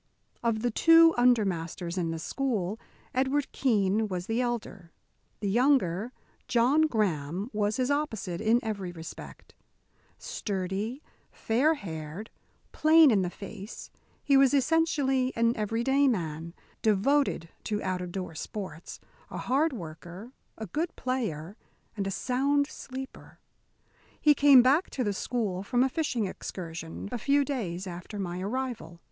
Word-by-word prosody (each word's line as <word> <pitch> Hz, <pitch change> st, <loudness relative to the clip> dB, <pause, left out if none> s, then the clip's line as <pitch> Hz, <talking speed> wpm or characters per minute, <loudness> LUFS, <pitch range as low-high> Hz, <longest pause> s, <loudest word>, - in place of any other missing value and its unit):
Of 230 Hz, -1 st, 0 dB
the 245 Hz, -, +1 dB
two 330 Hz, +6 st, +6 dB
under 240 Hz, -3 st, +4 dB
masters 170 Hz, -1 st, -4 dB
in 175 Hz, -3 st, -1 dB
the 165 Hz, -, -3 dB
school, 215 Hz, +1 st, -2 dB, 0.3 s
Edward 270 Hz, +2 st, 0 dB
Keene 215 Hz, -4 st, +1 dB
was 180 Hz, -3 st, -4 dB
the 225 Hz, +4 st, 0 dB
elder. 210 Hz, -8 st, -4 dB, 0.5 s
The 205 Hz, -, -1 dB
younger, 235 Hz, -3 st, +2 dB, 0.4 s
John 265 Hz, +6 st, +3 dB
Graham, 190 Hz, -, -1 dB
was 210 Hz, 0 st, 0 dB
his 255 Hz, +1 st, +1 dB
opposite 220 Hz, -, -2 dB
in 225 Hz, +2 st, +3 dB
every 200 Hz, -5 st, -3 dB
respect. 165 Hz, -1 st, -10 dB, 0.6 s
Sturdy, 200 Hz, +6 st, -4 dB, 0.3 s
fair 270 Hz, +8 st, +1 dB
haired, 165 Hz, -, -7 dB, 0.4 s
plain 315 Hz, -2 st, +6 dB
in 205 Hz, -4 st, +3 dB
the 180 Hz, -, -1 dB
face, 200 Hz, +3 st, -9 dB, 0.3 s
he 280 Hz, -, +3 dB
was 270 Hz, +1 st, +5 dB
essentially 270 Hz, -3 st, +2 dB
an 230 Hz, +1 st, +2 dB
every 225 Hz, +2 st, -1 dB
day 275 Hz, +2 st, +3 dB
man, 165 Hz, -, -2 dB, 0.3 s
devoted 220 Hz, -, +2 dB, 0.2 s
to 210 Hz, -1 st, -2 dB
out 185 Hz, -1 st, -2 dB
of 180 Hz, -1 st, -5 dB
door 180 Hz, -3 st, -5 dB
sports, 185 Hz, -1 st, -7 dB, 0.3 s
a -, -, -6 dB
hard 285 Hz, +6 st, +1 dB
worker, 175 Hz, -, -9 dB, 0.3 s
a 220 Hz, -, -5 dB
good 315 Hz, -, -3 dB
player, 205 Hz, -, -3 dB, 0.4 s
and 200 Hz, -2 st, -2 dB
a -, -, -1 dB
sound 275 Hz, +7 st, +1 dB
sleeper. 265 Hz, -2 st, -9 dB, 0.8 s
He 300 Hz, -, +6 dB
came 280 Hz, -3 st, +7 dB
back 285 Hz, +8 st, +3 dB
to 255 Hz, -, -2 dB
the 205 Hz, -3 st, 0 dB
school, 200 Hz, -3 st, -2 dB
from 245 Hz, +5 st, +1 dB
a 265 Hz, -, +2 dB
fishing 255 Hz, -7 st, -1 dB
excursion, 165 Hz, -2 st, -6 dB
a 245 Hz, -, -3 dB
few 280 Hz, +4 st, +2 dB
days 195 Hz, -10 st, -3 dB
after 180 Hz, +3 st, -7 dB
my 180 Hz, -2 st, -4 dB
arrival. 210 Hz, -6 st, -4 dB
220 Hz, 140 wpm, -28 LUFS, 185-265 Hz, 0.8 s, came